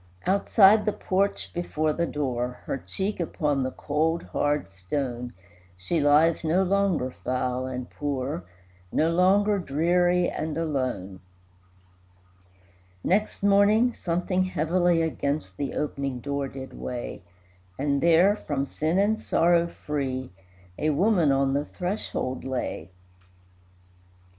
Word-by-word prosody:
Outside 200 +2 +5
the 210 - +2
porch 195 +2 -1
before 155 -3 -1
the 170 +1 -1
door, 125 -4 -3
Her 135 - -3
cheek 195 +8 -4
upon 150 -4 0
the 130 - 0
cold, 160 +5 -1
hard 145 0 -1
stone, 120 +6 -4 0.5
She 95 - -1
lies, 150 +4 +4
no 170 +4 +2
longer 190 -8 +1
foul 125 0 -2
and 125 -1 -5
poor, 140 -6 -3 0.5
No 160 +2 +2
longer 200 +4 +3
dreary 175 +3 +2
and 155 0 -3
alone. 130 - -2 1.8
Next 205 +2 0
morning 205 +4 +4
something 180 +1 -1
heavily 175 0 +1
Against 145 - -2
the 140 - -3
opening 140 -3 -2
door 140 +1 -2
did 135 0 -9
weigh, 120 -4 -6 0.6
And 140 0 0
there, 170 +5 +5
from 140 -8 -3
sin 155 +5 -1
and 210 +2 +2
sorrow 170 0 +3
free, 135 -6 -4 0.5
A 155 - +1
woman 175 -1 +3
on 135 0 +2
the 145 +1 0
threshold 180 -9 -3
lay. 125 -10 -4
155 Hz, 120 wpm, -26 LUFS, 135-180 Hz, 1.8 s, Outside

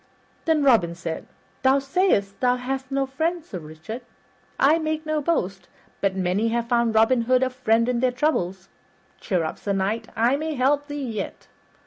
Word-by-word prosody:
Then 320 -3 +3
Robin 215 -11 +4
said, 165 -2 -5 0.3
"Thou 265 +1 +4
sayst 275 - +1
thou 250 -1 +3
hast 260 +1 -4
no 275 0 0
friends, 320 +5 -2
Sir 180 - -5
Richard. 160 +9 -8 0.6
I 305 +4 +5
make 315 0 -2
no 310 -1 0
boast, 195 - -1 0.3
but 195 -1 +1
many 190 +4 +1
have 235 +1 -1
found 235 -2 +2
Robin 225 +3 +4
Hood 255 +1 +3
a 260 - 0
friend 230 -2 +2
in 250 -1 +1
their 255 0 +2
troubles. 195 - -1 0.5
Cheer 180 -5 0
up, 160 - -4
Sir 200 - -2
Knight, 210 +4 -1
I 240 +5 +3
may 310 +1 -3
help 285 +3 +2
thee 290 -2 -4
yet." 215 -5 -5
250 Hz, 175 wpm, -24 LUFS, 200-275 Hz, 0.6 s, I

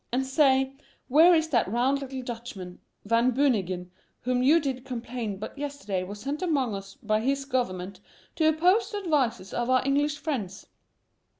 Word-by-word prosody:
And, 260 +2 0
stay; 265 -1 +3 0.4
where 325 +6 +7
is 320 0 +1
that 240 -9 +2
round 260 +4 +1
little 265 -1 -6
Dutchman, 230 -7 -7 0.3
Van 230 +3 +3
Beunigen, 195 -10 0 0.3
whom 250 0 0
you 295 +6 +5
did 265 -4 -3
complain 240 -4 -5
but 210 - -7
yesterday 280 -10 -3
was 200 +3 -7
sent 280 - -4
among 280 - 0
us 195 0 -7
by 215 0 +1
his 275 +3 0
government 195 -8 -2 0.4
to 315 -1 +4
oppose 365 +7 +3
the 420 - -4
advices 265 - 0
of 240 +1 -1
our 255 0 +3
English 290 +2 +1
friends. 240 - -4
255 Hz, 165 wpm, -27 LUFS, 220-285 Hz, 0.4 s, where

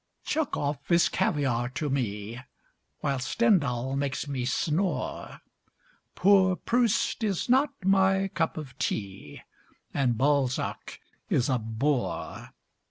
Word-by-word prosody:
Chekov 150 - -1
is 170 -1 +4
caviar 125 -5 0
to 150 - -1
me, 115 -4 -3 0.6
While 140 -2 0
Stendhal 135 - +1
makes 140 +1 -2
me 130 -3 -2
snore; 160 +7 -2 0.7
Poor 190 -1 +5
Proust 235 +1 +1
is 200 -5 -1
not 265 +4 +4 0.2
my 195 0 +3
cup 165 -2 -1
of 140 -4 -7
tea, 95 -8 -4 0.5
And 125 -5 +1
Balzac 135 -1 0 0.3
is 125 - +2
a 130 -2 +2
bore. 115 +5 -2
145 Hz, 105 wpm, -27 LUFS, 125-190 Hz, 0.7 s, Poor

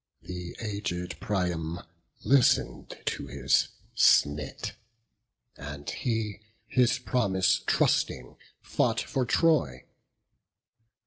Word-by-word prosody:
The 90 -1 -7
aged 100 -5 -4
Priam 90 -6 -2 0.4
listen'd 135 -2 +2
to 70 - -3
his 70 +1 +2 0.3
snit; 75 +1 +3 0.8
And 70 +1 -8
he, 110 -4 -2 0.2
his 125 +2 +2
promise 95 -7 +1
trusting, - - +1 0.3
fought - - +1
for 130 -2 -2
Troy. 145 - +2
95 Hz, 80 wpm, -28 LUFS, 80-115 Hz, 0.8 s, snit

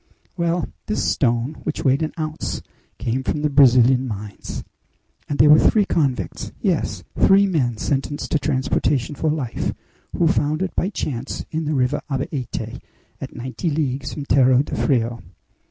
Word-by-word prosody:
Well, 170 -1 0 0.2
this 210 - -1
stone, 120 +1 +1
which 155 - -3
weighed 135 +2 +3
an 155 - -1
ounce, 155 -1 -3 0.3
came 125 +2 -1
from 150 +3 -2
the 150 - +1
Brazilian 130 -1 +5
mines! 105 -2 -6 0.7
And 145 - -1
they 150 - +6
were 150 +1 +8
three 210 -2 +4
convicts 130 - -1
yes! - - -1 0.2
three 195 +1 +6
men 135 - 0
sentenced 140 +5 -2
to 155 - +2
transportation 135 0 0
for 155 +3 -1
life 145 -6 -2 0.4
who 170 - +3
found 155 -1 +1
it 190 - -4
by 185 - +1
chance 135 - -4
in 160 0 -2
the 150 0 0
River 130 +2 +1
Abaete, 135 -2 -4 0.4
at - - -7
ninety 130 +7 -3
leagues 140 -3 -1
from 145 - -5
Terro 130 -1 +4
de - - -8
Frio." 120 -3 0
140 Hz, 155 wpm, -22 LUFS, 125-155 Hz, 0.7 s, were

